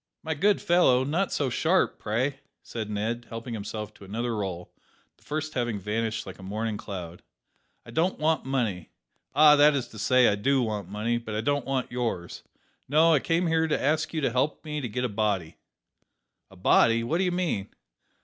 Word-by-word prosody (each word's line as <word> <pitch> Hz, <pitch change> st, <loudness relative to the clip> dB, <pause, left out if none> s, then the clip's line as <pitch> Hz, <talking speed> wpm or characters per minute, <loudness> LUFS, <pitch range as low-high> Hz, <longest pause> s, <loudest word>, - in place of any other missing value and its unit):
"My 160 Hz, -, -1 dB
good 200 Hz, +7 st, +2 dB
fellow, 150 Hz, -8 st, +4 dB
not 165 Hz, +8 st, 0 dB
so 135 Hz, -4 st, 0 dB
sharp, 170 Hz, +8 st, +1 dB
pray," 130 Hz, +6 st, -1 dB, 0.2 s
said 110 Hz, -3 st, -5 dB
Ned, 115 Hz, +3 st, -3 dB
helping 115 Hz, +1 st, -6 dB
himself 105 Hz, 0 st, -5 dB
to 105 Hz, -, -16 dB
another 115 Hz, +4 st, -3 dB
roll, 95 Hz, -4 st, -5 dB, 0.4 s
the -, -, -27 dB
first 155 Hz, +1 st, -4 dB
having 120 Hz, -4 st, -1 dB
vanished 110 Hz, +3 st, -2 dB
like -, -, -9 dB
a -, -, -10 dB
morning 105 Hz, +3 st, -3 dB
cloud; 90 Hz, -5 st, -7 dB, 0.6 s
"I -, -, -11 dB
don't 170 Hz, +4 st, +1 dB
want 155 Hz, +1 st, +1 dB
money 115 Hz, -10 st, -2 dB, 0.5 s
ah: 150 Hz, 0 st, +8 dB
that 145 Hz, 0 st, +6 dB
is 130 Hz, -4 st, -2 dB
to 110 Hz, -, -11 dB
say, 125 Hz, +3 st, +4 dB
I -, -, +4 dB
do 130 Hz, +6 st, +2 dB
want 105 Hz, -5 st, -3 dB
money, 110 Hz, +4 st, -1 dB
but 110 Hz, -2 st, -6 dB
I 110 Hz, -, 0 dB
don't 145 Hz, +1 st, 0 dB
want 130 Hz, -3 st, -1 dB
yours. 115 Hz, -8 st, -3 dB, 0.5 s
No; 160 Hz, +3 st, +5 dB
I 150 Hz, -, +4 dB
came 165 Hz, +5 st, 0 dB
here 160 Hz, -1 st, +2 dB
to 155 Hz, -, 0 dB
ask 150 Hz, +3 st, 0 dB
you 160 Hz, -, -2 dB
to 135 Hz, -, +1 dB
help 135 Hz, +6 st, -1 dB
me 150 Hz, -1 st, -3 dB
to 125 Hz, -, -4 dB
get 125 Hz, +4 st, -2 dB
a -, -, +2 dB
body." 100 Hz, -7 st, -1 dB, 0.9 s
"A 95 Hz, -, -16 dB
body. 115 Hz, +5 st, +4 dB
What 160 Hz, +9 st, 0 dB
do -, -, +2 dB
you 180 Hz, -, +1 dB
mean?" 170 Hz, -, -1 dB
120 Hz, 195 wpm, -27 LUFS, 105-150 Hz, 0.9 s, ah